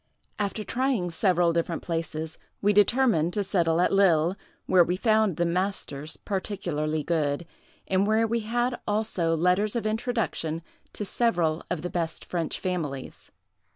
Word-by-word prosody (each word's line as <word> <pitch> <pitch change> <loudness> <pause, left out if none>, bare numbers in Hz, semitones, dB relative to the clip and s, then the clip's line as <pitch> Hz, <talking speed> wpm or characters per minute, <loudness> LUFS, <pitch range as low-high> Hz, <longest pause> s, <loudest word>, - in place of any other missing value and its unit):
After 210 +1 -2
trying 240 -7 0
several 175 -1 +2
different 170 0 -1
places, 160 -1 -4 0.2
we 205 +1 +3
determined 205 -5 +3
to 205 - 0
settle 170 -4 +1
at 180 - +3
Lille, 180 -3 +4 0.3
where 185 -2 +6
we 180 +2 -1
found 215 -4 +2
the 175 - +2
masters 170 -4 -2
particularly 165 -6 -2
good, 155 -1 0 0.4
and 190 +1 +2
where 220 +1 +3
we 230 +1 0
had 240 +3 -1
also 205 -6 0
letters 180 +6 +2
of 235 - -1
introduction 215 -8 -1 0.3
to 210 - -4
several 175 -8 +1
of 175 -3 -2
the 180 - -2
best 165 -2 -2
French 170 -3 -2
families. 155 -8 -4
180 Hz, 145 wpm, -27 LUFS, 165-210 Hz, 0.4 s, where